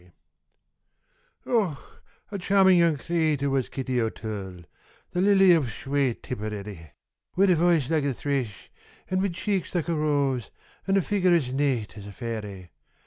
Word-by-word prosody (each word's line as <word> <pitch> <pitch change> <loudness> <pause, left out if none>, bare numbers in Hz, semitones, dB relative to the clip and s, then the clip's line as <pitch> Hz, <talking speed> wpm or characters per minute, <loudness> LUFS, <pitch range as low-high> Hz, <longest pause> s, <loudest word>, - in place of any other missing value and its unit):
_ - - -22 1.4
Och! 200 - +1 0.5
a 200 - -4
charmin' 190 0 +4
young 170 -3 +3
cratur' 155 -3 0
was 135 -2 0
Kitty 130 -2 -2
O'Toole, 105 -5 -5 0.5
The 180 - -1
lily 195 -2 +6
ov 150 -6 +1
shwate 135 +2 -2
Tipperary; 105 - -6 0.4
Wid 195 +1 +4
a - - +5
voice 165 -4 +3
like 155 -2 +1
a 140 - 0
thrish, 135 -7 -3 0.4
and 185 0 +1
wid 195 -3 -1
cheeks 190 -1 -2
like 170 -1 -1
a - - +1
rose, 140 -6 0 0.4
An' 195 0 +3
a 195 - +2
figger 185 -3 +2
as 130 -6 0
nate 130 -7 -1
as 100 - -10
a - - -8
fairy! 105 -6 -6
140 Hz, 155 wpm, -26 LUFS, 115-175 Hz, 1.4 s, lily